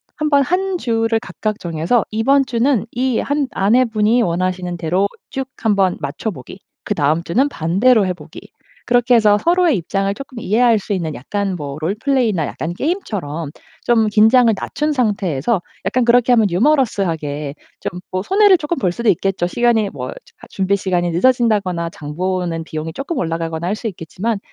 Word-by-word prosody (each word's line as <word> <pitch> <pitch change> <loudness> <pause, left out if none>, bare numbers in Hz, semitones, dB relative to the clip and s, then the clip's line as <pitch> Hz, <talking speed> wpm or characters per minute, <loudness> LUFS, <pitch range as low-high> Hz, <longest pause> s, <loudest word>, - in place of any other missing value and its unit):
한번 300 -2 +2
1 370 +4 -1
주를 225 -3 0
각각 215 -2 -4
정해서 170 +6 0
이번 270 +6 +3
주는 235 -1 +1
이 250 -1 0
한 285 -1 -1
아내분이 225 +1 +2
원하시는 180 0 -1
대로 180 +5 +1 0.2
"쭉 265 0 -4 0.2
한번 200 -4 +2
맞춰 145 +9 -3
보기." 190 - -11 0.2
그다음 160 -4 +1
주는 255 +11 +1
"반대로 200 - +2
해 180 - -1
보기." 180 - -12 0.5
그렇게 245 0 +3
해서 215 -3 +5
서로의 340 - +2
입장을 195 +3 -1
조금 260 0 -9
이해할 230 +1 +3
수 205 +1 -4
있는 165 -5 -2
약간 195 +8 -3
뭐 145 -3 -6
롤플레이나 210 - 0
약간 170 +2 -4
게임처럼 180 - -3 0.3
좀 225 -2 +3
긴장을 225 +3 +5
낮춘 300 0 -2
상태에서 200 - 0 0.2
약간 255 - +1
그렇게 245 +1 +4
하면 220 -4 +4
유머러스하게 175 - 0 0.3
좀 180 - -5
뭐 185 +1 -2
손해를 395 - +5
쪼끔 330 +1 -3
볼 185 -8 +1
수도 235 +6 -4
있겠죠. 190 0 +1
시간이 225 +2 +1
뭐 130 -3 -6
저 - - -6 0.3
하 - - -14
준비 195 0 0
시간이 180 -3 -1
늦어진다거나 200 -5 +1
장 150 -2 -8
보는 180 -2 -2
비용이 160 0 -6
조금 290 +4 -4
올라가거나 165 0 -3
할 205 - 0
수 220 - -11
있겠지만 195 +4 -4
205 Hz, 360 characters per minute, -18 LUFS, 175-245 Hz, 0.5 s, 해서